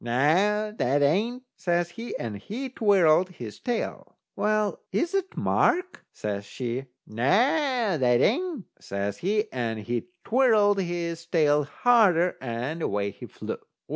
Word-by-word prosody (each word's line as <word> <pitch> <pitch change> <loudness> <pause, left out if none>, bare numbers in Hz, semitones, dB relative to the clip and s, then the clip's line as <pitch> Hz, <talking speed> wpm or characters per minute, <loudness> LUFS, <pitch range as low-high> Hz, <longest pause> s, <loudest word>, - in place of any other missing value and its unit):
"Noo, 180 - +2
that 140 +3 +2
ain't," 220 - +1
says 175 -1 0
he, 230 +7 -6
and 115 -3 -4
he 230 - -6
twirled 185 -7 +3
his 120 - -9
tail. 240 -2 -4 0.2
"Well, 210 -3 0
is 280 - 0
that 390 -1 -2
Mark?" 365 +1 +1
says 100 -1 -4
she. 125 +5 -4 0.2
"Noo, 110 - -11
that 210 - +2
ain't," 340 - 0
says 100 +1 -4
he, 210 +4 +1
and 115 -3 -2
he 120 +2 -3 0.2
twirled 215 -5 +3
his 170 -2 -4
tail 150 -3 +3
harder, 180 - +3
and 130 +6 -4
away 100 -6 -1
he - - -11
flew. - - -6
175 Hz, 135 wpm, -26 LUFS, -, 0.2 s, twirled